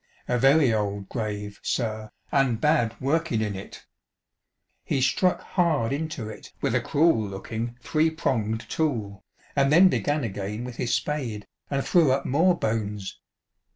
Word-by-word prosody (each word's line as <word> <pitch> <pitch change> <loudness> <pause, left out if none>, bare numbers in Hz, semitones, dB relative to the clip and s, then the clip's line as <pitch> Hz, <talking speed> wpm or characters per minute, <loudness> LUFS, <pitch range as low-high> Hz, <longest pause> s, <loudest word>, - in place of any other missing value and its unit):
A 125 0 +1
very 135 -1 +5
old 100 -2 -2
grave, 105 -3 -4
sir, 110 -3 -2 0.2
and 135 -5 +2
bad 135 -7 +2
workin' 155 -1 0
in 105 -2 -2
it." 95 - -10 1.0
He - - -1
struck 180 +7 +2
hard 155 -10 +1
into 150 -6 -3
it 110 - -10
with - - 0
a - - +2
cruel 155 -6 +3
looking 110 +4 -5
three 155 +1 +2
pronged 115 -8 -1
tool, 110 -11 -2 0.3
and 140 0 +3
then 180 +5 +7
began 145 -4 0
again 105 +1 -4
with 125 -1 -7
his 120 - -1
spade, 120 -9 -2 0.2
and 140 -1 0
threw^ 170 -5 +4
up 135 +1 +1
more 175 +6 +3
bones. 105 - -3
120 Hz, 150 wpm, -26 LUFS, 110-150 Hz, 1.0 s, then